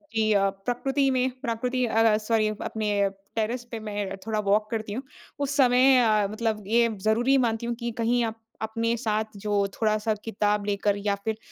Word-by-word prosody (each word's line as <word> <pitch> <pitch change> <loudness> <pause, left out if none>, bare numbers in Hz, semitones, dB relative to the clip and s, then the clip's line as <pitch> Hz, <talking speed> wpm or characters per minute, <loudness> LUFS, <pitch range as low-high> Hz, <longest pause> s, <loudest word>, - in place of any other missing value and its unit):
जी 220 -1 +2
अ, 195 -1 +3
प्रकृति 250 +8 -1
में 255 0 +1
प्रकृति 250 +1 -1
अ 225 -1 +2
अ, - - +3
सॉरी 215 0 +1
अपने 205 -2 0 0.3
टेरेस 230 +2 -1
पे 230 - -4
मैं 205 -2 -4
थोड़ा 220 -1 0
वॉक 210 +2 +2
करती 220 -2 -3
हूँ। 255 +5 -4 0.4
उस 280 0 -1
समय 255 0 +5
अ, 215 -4 +3
मतलब 215 -1 -2
ये 235 +2 +4
ज़रूरी 240 +6 +3
मानती 235 -2 0
हूँ 235 - -2
कि 235 -1 -3
कहीं 235 +1 +2
आप 225 0 -6 0.2
अपने 230 +1 -1
साथ 220 -2 -1 0.2
जो 205 -1 +1
थोड़ा-सा 215 0 +1
किताब 210 -2 0
लेकर 205 0 0
या 205 0 0
फिर 220 -1 -1
220 Hz, 180 wpm, -26 LUFS, 210-240 Hz, 0.4 s, समय